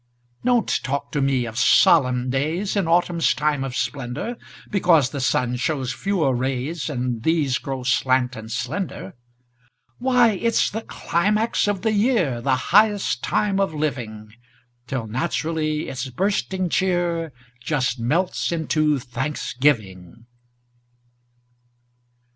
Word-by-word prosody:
Don't 245 -2 +2
talk 140 +1 -3
to 145 - -1
me 135 -3 +1
of 115 +1 -5
solemn 125 -2 +4
days 160 +10 -1
In 195 -4 +1
autumn's 170 0 +2
time 150 -2 0
of 130 -2 -5
splendor, 130 - -3 0.4
Because 165 -9 +3
the 140 - -4
sun 125 -1 +1
shows 130 -2 -1
fewer 180 -9 0
rays, 135 +6 -2
And 125 -4 -2
these 150 -3 +1
grow 135 -2 -5
slant 130 -1 +1
and 110 +1 -9
slender. 125 - -4 0.9
Why, 250 -2 +4
it's 230 +3 +1
the 220 - -4
climax 210 +3 0
of 205 -2 -1
the 220 - +2
year, 205 - +1
The 130 +1 +2
highest 205 - +2
time 200 -2 +1
of 195 -5 0
living! 120 -8 -4 0.6
Till 125 -3 -3
naturally 155 +5 -2
its 130 0 -4
bursting 190 - -1
cheer 175 -3 0 0.3
Just 130 -3 -1
melts 165 +13 0
into 155 -2 +1
thanksgiving. 120 - -2
145 Hz, 120 wpm, -22 LUFS, 125-180 Hz, 0.9 s, solemn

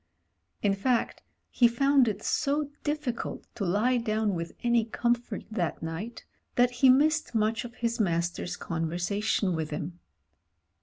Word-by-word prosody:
In 200 -1 +3
fact 235 +5 0 0.3
he 240 -2 +5
fotmd 275 +2 +4
it 210 -1 -2
so 290 +1 0
difficult 295 -5 -3
to 205 - -4
lie 210 +8 +2
down 215 -3 0
with 170 -1 -4
any 235 -1 +3
comfort 235 -1 -1
that 180 -8 -2
night 170 +9 -5 0.3
that 245 0 +4
he 255 +2 +4
missed 305 +1 +3
much 220 +2 +1
of 240 0 -9
his 235 -1 -2
master's 175 -3 -1
conversation 175 +4 -1
with 160 -1 -2
him. 165 +3 -5
225 Hz, 140 wpm, -28 LUFS, 180-245 Hz, 0.3 s, he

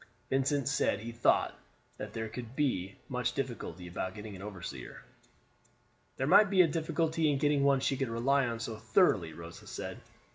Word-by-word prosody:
Vincent 135 0 +1
said 135 -7 +1
he 115 +2 -5
thought 115 +1 +2 0.4
that - - -6
there 110 0 -3
could 115 +2 -6
not 120 - -15
be 100 -10 0
much 125 -2 -1
difficulty 115 - -4
about 95 +1 -4
getting 105 -1 -7
an 95 - -9
overseer. 100 -3 -7 1.1
"There 135 - 0
might 195 +6 +7
be 185 -2 +6
a - - +3
difficulty 160 0 0
in 140 - +1
getting 145 0 +2
one 140 -1 +4
she 135 - +1
could 135 -2 -1
rely 130 +4 +2
on 115 -1 -3
so 115 -1 -4
thoroughly," 110 - +3
Rosa 85 +1 -10
said. - - -6
125 Hz, 180 wpm, -32 LUFS, 110-140 Hz, 1.1 s, might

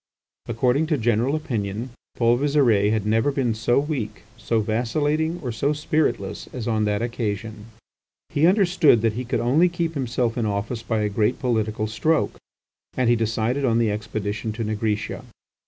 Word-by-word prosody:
According 125 +6 +1
to 155 -2 +1
general 120 +4 +1
opinion, 115 -6 -3 0.3
Paul 120 0 +3
Visire 130 -8 +3
had 110 -2 0
never 110 +6 +2
been 130 -4 0
so 115 +2 +1
weak, 135 -8 -4
so 115 0 -1
vacillating, 145 +10 0
or 125 - -2
so 140 +7 0
spiritless, 155 +1 -1
as 125 -3 -5
on 110 -2 +1
that 105 +1 0
occasion. 110 -2 -4 0.6
He 155 +3 +3
understood 175 - +4
that 115 -2 +2
he 125 +4 -3
could 125 +1 -1
only 150 +9 +3
keep 170 -1 -2
himself 125 -4 -1
in 110 - 0
office 105 +3 -2
by 110 -1 -1
a 105 - +1
great 105 +4 0
political 110 -3 -1
stroke, 155 +9 0 0.6
and 125 -2 +3
he - - +5
decided 115 +4 -1
on 115 -3 +2
the 115 -2 +2
expedition 105 0 -3
to 115 +1 -4
Nigritia. 105 -1 -2
115 Hz, 165 wpm, -23 LUFS, 110-140 Hz, 0.6 s, he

